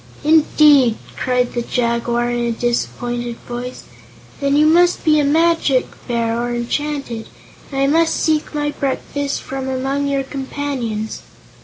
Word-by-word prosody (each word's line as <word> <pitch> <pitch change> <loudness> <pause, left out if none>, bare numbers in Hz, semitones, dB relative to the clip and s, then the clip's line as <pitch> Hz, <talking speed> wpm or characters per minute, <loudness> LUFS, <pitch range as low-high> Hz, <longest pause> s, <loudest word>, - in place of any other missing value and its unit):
"Indeed!" 295 -5 +5 0.2
cried 250 -1 0
the 240 - -1
Jaguar, 235 0 0
in 240 - -1
a 235 0 0
disappointed 240 0 -2
voice; 245 +1 -6 0.6
"then 280 0 +1
you 300 +1 +5
must 345 +3 +4
be 305 -2 +4
a - - +3
magic 315 -3 +3 0.2
Bear, 235 -1 0
or 240 0 -2
enchanted, 245 -1 -3 0.4
and 270 - -3
I 275 - +3
must 325 +3 +3
seek 310 -1 0
my 295 0 0
breakfast 280 0 -3
from 265 0 -4
among 270 +2 -1
your 275 -1 0
companions." 265 -5 -4
270 Hz, 140 wpm, -19 LUFS, 240-295 Hz, 0.6 s, Indeed